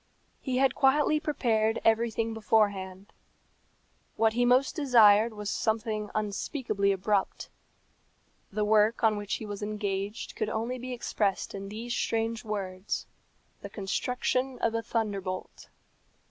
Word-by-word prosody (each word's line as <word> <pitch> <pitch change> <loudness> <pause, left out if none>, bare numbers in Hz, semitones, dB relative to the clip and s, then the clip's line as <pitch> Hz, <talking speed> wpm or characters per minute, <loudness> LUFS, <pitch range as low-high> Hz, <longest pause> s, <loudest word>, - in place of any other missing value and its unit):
He 255 -2 -2
had 270 0 +3
quietly 295 +3 +3
prepared 225 -7 0
everything 225 0 +2
beforehand. 200 -3 0 1.0
What 220 0 +2
he 245 +1 +2
most 255 +2 +3
desired 230 -6 +5
was 210 -1 -7
something 215 -1 -1
unspeakably 210 0 -1
abrupt. 195 +1 -1 1.0
The 210 +1 0
work 215 +2 +3
on 220 -1 +4
which 205 -1 -3
he 220 - -6
was 205 -1 -6
engaged 205 0 -3
could 215 -1 -2
only 230 +4 -3
be 255 +1 -6
expressed 210 -5 -1
in 195 0 -6
these 230 +3 -5
strange 225 -1 -1
words 195 -2 -4 0.6
the - - -7
construction 250 +5 -1
of 230 - 0
a 230 - 0
thunderbolt. 200 -5 -4
220 Hz, 125 wpm, -28 LUFS, 205-235 Hz, 1.0 s, desired